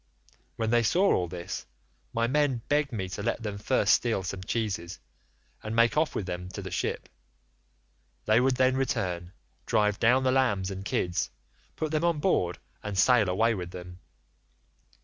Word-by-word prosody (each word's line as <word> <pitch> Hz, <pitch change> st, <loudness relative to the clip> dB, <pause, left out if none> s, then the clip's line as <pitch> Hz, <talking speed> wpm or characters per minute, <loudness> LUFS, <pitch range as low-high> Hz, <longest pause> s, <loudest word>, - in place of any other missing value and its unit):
When 110 Hz, -1 st, -1 dB
they 120 Hz, 0 st, +4 dB
saw 180 Hz, -, +3 dB
all 90 Hz, -, +1 dB
this, 85 Hz, 0 st, -6 dB, 0.4 s
my 115 Hz, 0 st, +1 dB
men 135 Hz, -2 st, +1 dB
begged 145 Hz, -1 st, +1 dB
me 95 Hz, -6 st, -3 dB
to 95 Hz, -, -5 dB
let 115 Hz, -, -2 dB
them 105 Hz, -2 st, -4 dB
first 105 Hz, 0 st, +3 dB
steal 115 Hz, -5 st, +1 dB
some 95 Hz, +1 st, -4 dB
cheeses, 95 Hz, -5 st, -3 dB, 0.6 s
and 110 Hz, +1 st, -4 dB
make 115 Hz, 0 st, +4 dB
off 155 Hz, 0 st, +1 dB
with 100 Hz, -, -2 dB
them 90 Hz, 0 st, -5 dB
to 100 Hz, -, -6 dB
the 95 Hz, -, -6 dB
ship; 90 Hz, -, -2 dB, 1.2 s
they 110 Hz, +2 st, +4 dB
would 130 Hz, +1 st, +2 dB
then 130 Hz, 0 st, +3 dB
return, 90 Hz, -9 st, -2 dB, 0.4 s
drive 105 Hz, -2 st, +2 dB
down 125 Hz, +3 st, +4 dB
the 130 Hz, -, +3 dB
lambs 105 Hz, -8 st, +1 dB
and 95 Hz, 0 st, -6 dB
kids, 90 Hz, -2 st, -1 dB, 0.5 s
put 155 Hz, -1 st, -3 dB
them 155 Hz, +1 st, 0 dB
on 170 Hz, -2 st, +2 dB
board 120 Hz, -, +1 dB, 0.2 s
and 105 Hz, -2 st, -5 dB
sail 110 Hz, -1 st, +5 dB
away 115 Hz, +5 st, +2 dB
with 90 Hz, -4 st, -5 dB
them. 90 Hz, 0 st, -9 dB
110 Hz, 170 wpm, -28 LUFS, 95-130 Hz, 1.2 s, sail